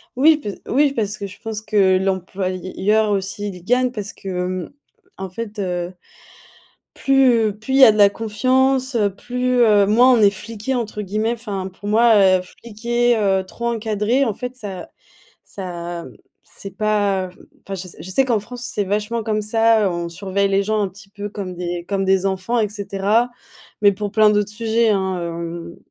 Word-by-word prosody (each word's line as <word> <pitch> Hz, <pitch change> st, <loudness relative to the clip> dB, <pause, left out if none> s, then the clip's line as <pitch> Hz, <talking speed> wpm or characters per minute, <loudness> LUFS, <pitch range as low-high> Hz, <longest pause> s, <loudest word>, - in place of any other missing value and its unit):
Oui, 300 Hz, +4 st, +5 dB
pe 210 Hz, -9 st, -6 dB, 0.2 s
oui, 280 Hz, +2 st, +3 dB
parce 215 Hz, -3 st, -2 dB
que 200 Hz, -, -5 dB
je 195 Hz, -, -10 dB
pense 220 Hz, -2 st, -5 dB
que 200 Hz, -3 st, +3 dB
l'employeur 190 Hz, +2 st, -1 dB
aussi 200 Hz, +1 st, -2 dB
il 180 Hz, -2 st, -10 dB
gagne 250 Hz, +3 st, +2 dB
parce 210 Hz, -3 st, -6 dB
que, -, -, -12 dB
hem, 180 Hz, 0 st, -3 dB, 0.5 s
en 190 Hz, -, -5 dB
fait, 215 Hz, +1 st, -6 dB
heu, 180 Hz, -2 st, -2 dB, 1.0 s
plus, 250 Hz, -6 st, +3 dB
plus 265 Hz, +5 st, -4 dB
il -, -, +4 dB
y -, -, +12 dB
a 220 Hz, -, +8 dB
de 215 Hz, -, -3 dB
la 200 Hz, -1 st, +7 dB
confiance, 260 Hz, +5 st, +1 dB
heu, 205 Hz, -4 st, +1 dB
plus, 250 Hz, +2 st, -1 dB
heu 210 Hz, -3 st, +5 dB
moins 240 Hz, +5 st, +5 dB
on 240 Hz, -, +3 dB
est 200 Hz, -1 st, +6 dB
«fliqué» 220 Hz, +5 st, -5 dB
entre 215 Hz, -3 st, -3 dB
guillemets. 215 Hz, +4 st, -1 dB
Enfin, 205 Hz, -5 st, -5 dB
pour 195 Hz, +2 st, -10 dB
moi, 225 Hz, +2 st, +5 dB, 0.2 s
heu, -, -, -5 dB
fliquée, 235 Hz, +5 st, -1 dB
heu, 195 Hz, -2 st, +2 dB
trop 235 Hz, +5 st, -5 dB
encadrer, 225 Hz, +3 st, 0 dB
en 225 Hz, -, -1 dB
fait, 250 Hz, +4 st, -6 dB
ça 195 Hz, -7 st, -7 dB, 0.5 s
ça, 175 Hz, -3 st, -6 dB, 0.4 s
c'est 195 Hz, -1 st, -10 dB
pas, 205 Hz, -3 st, +1 dB
heu, 180 Hz, -, -18 dB, 0.2 s
enfin, 195 Hz, -, -4 dB
je 185 Hz, 0 st, -7 dB
sais -, -, -10 dB
je 185 Hz, -, -8 dB
sais 270 Hz, +7 st, +3 dB
qu'en 235 Hz, -4 st, +2 dB
France 245 Hz, +4 st, -9 dB
c'est 210 Hz, -5 st, -1 dB
vachement 210 Hz, +4 st, -2 dB
comme 215 Hz, 0 st, -1 dB
ça, 225 Hz, 0 st, +3 dB
heu, -, -, +3 dB
on 170 Hz, -1 st, -3 dB
surveille 195 Hz, +2 st, -1 dB
les 195 Hz, 0 st, +2 dB
gens 215 Hz, +1 st, 0 dB
un 200 Hz, -, 0 dB
petit 195 Hz, +2 st, -16 dB
peu 205 Hz, 0 st, -7 dB
comme 190 Hz, -3 st, -6 dB
des 175 Hz, 0 st, -4 dB
comme 195 Hz, -1 st, 0 dB
des 190 Hz, 0 st, +2 dB
enfants, 195 Hz, +5 st, -1 dB
et 210 Hz, -, +1 dB
cetera. 205 Hz, +3 st, 0 dB, 0.5 s
Mais 205 Hz, -1 st, +5 dB
pour 205 Hz, +1 st, -4 dB
plein 215 Hz, 0 st, +5 dB
d'autres 210 Hz, 0 st, +1 dB
sujets, 225 Hz, +1 st, +1 dB
hein, 190 Hz, -2 st, 0 dB
hem. 170 Hz, 0 st, -6 dB
210 Hz, 190 wpm, -20 LUFS, 190-230 Hz, 1.0 s, y